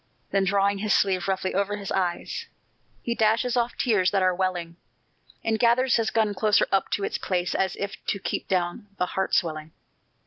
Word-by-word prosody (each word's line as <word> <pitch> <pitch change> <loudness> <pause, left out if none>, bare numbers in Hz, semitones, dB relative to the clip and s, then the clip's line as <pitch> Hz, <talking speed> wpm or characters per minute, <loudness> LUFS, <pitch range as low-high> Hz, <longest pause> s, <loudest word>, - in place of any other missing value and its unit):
Then 195 -1 +2
drawing 200 +1 +2
his 210 +1 +2
sleeve 190 -2 +1
roughly 190 -1 -1
over 200 +1 0
his 200 -2 -6
eyes, 180 -2 -2 0.6
He 235 - -1
dashes 230 +3 +2
off 240 0 0
tears 210 -7 +2
that 195 -2 +1
are 185 0 +3
welling, 175 -2 -2 0.7
And 220 -1 0
gathers 245 +2 +4
his 225 -1 +1
gun 215 -2 +1
closer 210 +1 +3
up 195 -1 +1
to 200 - -1
its - - -2
place 180 -1 -1
As 190 -1 0
if 200 0 -6
to - - 0
keep 195 - -4
down 185 +3 -1
the 180 - +1
heart 190 +1 -1
swelling. 155 -2 -1
195 Hz, 185 wpm, -25 LUFS, 185-215 Hz, 0.7 s, gathers